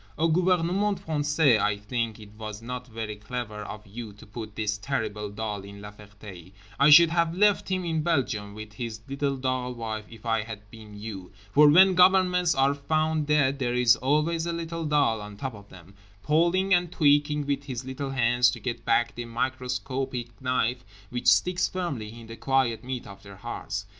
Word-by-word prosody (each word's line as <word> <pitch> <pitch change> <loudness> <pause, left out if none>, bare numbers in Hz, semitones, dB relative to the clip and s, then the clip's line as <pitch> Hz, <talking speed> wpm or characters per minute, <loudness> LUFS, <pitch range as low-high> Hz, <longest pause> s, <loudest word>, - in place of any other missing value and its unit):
O 165 - +2
gouvernement 180 +4 +2
français, 145 - +2
I 105 0 +1
think 110 +1 -3
it 105 -1 -12
was 105 -1 -7
not 125 +2 -6
very 110 -2 -5
clever 105 +1 -6
of 105 0 -8
you 105 +1 -8
to 105 - -15
put 110 0 -8
this 105 -1 -2
terrible 105 -4 -3
doll 105 -1 -4
in 100 +1 -11
La 105 0 -9
Ferté; 100 -3 -13 0.3
I 140 +2 +6
should 165 +2 +8
have 170 -1 +1
left 205 0 +3
him 185 -1 -1
in 160 -2 0
Belgium 125 -11 -1
with 110 -1 -9
his 110 0 -6
little 140 0 -2
doll 130 -1 -2
wife 110 -2 -5
if 115 -1 -14
I 115 -1 +1
had 105 -1 -9
been 110 -2 -12
You; 100 -4 -8 0.2
for 150 +6 +7
when 185 +5 +7
governments 180 -2 +4
are 135 +1 +3
found 155 +1 0
dead 145 -2 +2
there 125 -2 -1
is 125 -1 +5
always 155 +5 0
a 170 - -1
little 165 0 -4
doll 145 -8 +2
on 105 0 -9
top 135 +2 -4
of 100 -1 -13
them, 95 +1 -15 0.3
pulling 175 - +2
and 175 -1 +2
tweaking 145 -2 +2
with 140 0 -2
his 130 -2 -5
little 130 +1 -5
hands 120 -1 +3
to 120 -1 -5
get 115 +1 -4
back 120 +1 +2
the 120 - -6
microscopic 125 0 -3
knife 125 -1 0 0.3
which 125 0 -3
sticks 175 - +4
firmly 120 -12 -5
in 115 - -11
the 115 0 -9
quiet 130 -4 +1
meat 130 -1 -5
of 100 0 -12
their 100 -1 -13
hearts. - - -5
125 Hz, 190 wpm, -26 LUFS, 110-150 Hz, 0.3 s, should